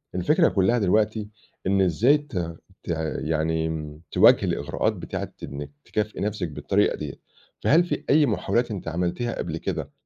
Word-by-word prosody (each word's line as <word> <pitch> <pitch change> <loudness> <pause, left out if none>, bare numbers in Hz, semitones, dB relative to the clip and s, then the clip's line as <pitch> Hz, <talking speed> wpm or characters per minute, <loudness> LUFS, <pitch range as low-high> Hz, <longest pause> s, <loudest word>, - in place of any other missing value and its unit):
الفكرة 150 - +3
كلّها 95 +5 +2
دلوقتي 105 +1 +1 0.4
إن 95 0 +3
إزاي 105 - +4
ت 145 -8 -8 0.5
ت - - -21 0.3
يعني 80 -1 -2
تواجهي - - +6
الإغراءات - - 0
بتاعة - - -5
إنِّك 70 +1 -6
تكافئي 105 0 -2
نفسِك 100 -3 -1
بالطريقة 75 - +1
ديَّة، - - -5 0.5
فهل 165 +4 +5
في 150 -5 -3
أي 150 +1 +6
محاولات 110 +1 0
أنتِ 100 -5 -5
عملتيها 90 +8 -2
قبل 80 -2 -3
كده - - -4
100 Hz, 145 wpm, -25 LUFS, 80-120 Hz, 0.5 s, تواجهي